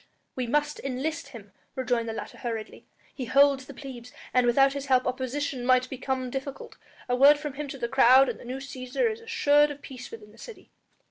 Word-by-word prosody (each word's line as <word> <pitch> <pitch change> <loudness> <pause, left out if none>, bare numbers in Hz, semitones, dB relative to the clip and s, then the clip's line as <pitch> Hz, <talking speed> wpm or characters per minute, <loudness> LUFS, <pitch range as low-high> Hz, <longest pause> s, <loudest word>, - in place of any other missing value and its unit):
"We 255 -2 -2
must 295 +4 0
enlist 275 +5 -3
him," 205 -5 -12 0.2
rejoined 245 -3 -1
the - - -3
latter - - -8
hurriedly; 225 -3 -6 0.3
"he 260 - -5
holds 275 +1 +3
the 280 - -9
plebs, 250 -3 -9 0.2
and 250 -1 +3
without 270 +3 +4
his 280 0 -5
help 255 -1 +3
our 255 - +1
position 260 0 -3
might 255 0 +2
become 260 -1 -3
difficult. 270 +1 -6 0.3
A 245 - +1
word 280 +3 +7
from 295 -2 -6
him 295 +1 -5
to 275 - -7
the 235 - -2
crowd 265 +1 +6
and - - -4
the - - -12
new 255 +2 -5
Cæsar 270 - -2
is 440 +1 -8
assured 295 -10 +3
of 290 0 -9
peace 255 -1 -9
within 210 -2 -11
the 225 - -19
city." 465 - -12
265 Hz, 210 wpm, -27 LUFS, 250-285 Hz, 0.3 s, word